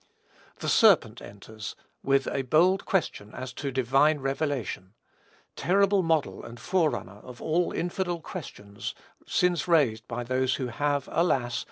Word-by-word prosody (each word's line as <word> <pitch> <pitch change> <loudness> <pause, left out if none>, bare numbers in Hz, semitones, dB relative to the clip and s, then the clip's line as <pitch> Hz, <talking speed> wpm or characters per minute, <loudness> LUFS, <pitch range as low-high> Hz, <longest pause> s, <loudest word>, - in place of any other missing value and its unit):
The - - -3
serpent - - +4
enters, 105 +2 -9 0.3
with 135 0 +2
a 135 - -1
bold 170 +9 +3
question 130 - -2
as 130 0 -6
to 140 +2 -4
divine 135 +4 +3
revelation, 135 -8 -3 0.6
terrible 200 +1 +3
model 165 -4 0
and 120 +1 -10
forerunner 155 - -1
of 125 +2 -12
all 170 +2 0
infidel 175 0 -2
questions 105 - -7 0.3
since 180 -2 +1
raised 130 -9 +2
by 120 0 -4
those 130 +1 0
who 130 -2 -3
have, 145 +3 -1
alas! 125 -8 +1
135 Hz, 135 wpm, -27 LUFS, 120-170 Hz, 0.6 s, serpent